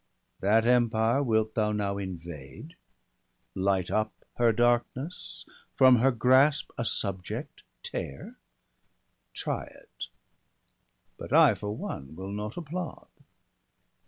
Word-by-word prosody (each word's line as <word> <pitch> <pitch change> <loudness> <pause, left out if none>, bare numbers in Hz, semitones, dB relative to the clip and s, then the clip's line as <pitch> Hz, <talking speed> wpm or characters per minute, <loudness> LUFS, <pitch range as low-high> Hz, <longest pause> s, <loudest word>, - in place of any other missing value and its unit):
That 110 +3 +3
empire 120 +1 +3
wilt 110 -4 +1
thou 110 -2 +1
now 100 -1 -1
invade, 85 - -8 0.8
light 95 +1 0
up 110 0 +1 0.3
Her 120 -1 +4
darkness, 120 +7 0 0.3
from 130 -2 +6
her 130 +4 +4
grasp 130 +4 +3
a 120 - -3
subject 95 -4 -2 0.2
tear? 70 - -6 0.4
— - - -46
Try - - -3
it; - - -10 1.1
but - - -9
I, - - +7
for 105 0 -5
one, 70 +3 -6
will 95 +3 -6
not 105 +4 -5
applaud. 175 +1 -6
110 Hz, 110 wpm, -28 LUFS, 100-125 Hz, 1.1 s, I